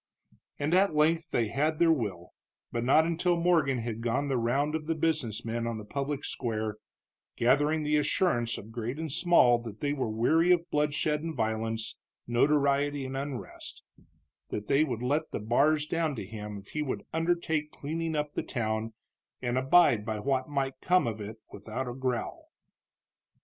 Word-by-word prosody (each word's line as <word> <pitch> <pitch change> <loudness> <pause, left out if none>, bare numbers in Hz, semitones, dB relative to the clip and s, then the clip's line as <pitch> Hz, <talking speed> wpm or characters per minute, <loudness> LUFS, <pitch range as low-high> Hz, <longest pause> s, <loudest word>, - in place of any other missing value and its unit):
And 145 +3 -1
at 185 -3 +4
length 160 +2 +2
they 115 -3 0
had 155 +5 0
their 165 0 +5
will, 100 - -2 0.4
but 115 0 -2
not 145 +6 +5
until 170 +1 +1
Morgan 165 -6 +3
had 115 -1 -4
gone 130 +5 0
the 135 - +1
round 135 +6 +1
of 155 -1 -3
the 165 - 0
business 155 -10 -1
men 115 0 -2
on 115 -1 -3
the 105 - -8
public 140 +5 -3
square, 110 -3 -3 0.6
gathering 145 +6 +2
the 150 0 +2
assurance 140 -6 +1
of 110 - -10
great 120 +3 -4
and 160 -2 -4
small 160 -7 +5
that 115 -3 -9
they 145 0 0
were 135 -5 -2
weary 160 +11 +3
of 170 -1 +3
bloodshed 150 0 +1
and 165 0 -4
violence, 110 0 -2 0.3
notoriety 140 +2 +2
and 130 +1 -5
unrest; 135 -2 -6 0.7
that 105 0 -4
they 140 +3 +4
would 125 -6 -3
let 150 +5 0
the - - -4
bars 145 +8 +2
down 160 -2 -1
to 110 - -5
him 105 0 -7
if 100 0 -12
he 150 - -3
would 140 -4 -3
undertake 160 -2 0
cleaning 160 +2 -3
up 150 0 -2
the - - -1
town, 110 -2 -2 0.5
and 120 -1 -2
abide 130 -3 +4
by 110 0 -3
what 130 +4 -1
might 135 -2 -2
come 180 0 +3
of 110 -2 -3
it 105 +2 -7
without 110 +6 -5
a 120 - -4
growl. 130 -2 -3
135 Hz, 175 wpm, -29 LUFS, 115-155 Hz, 0.7 s, their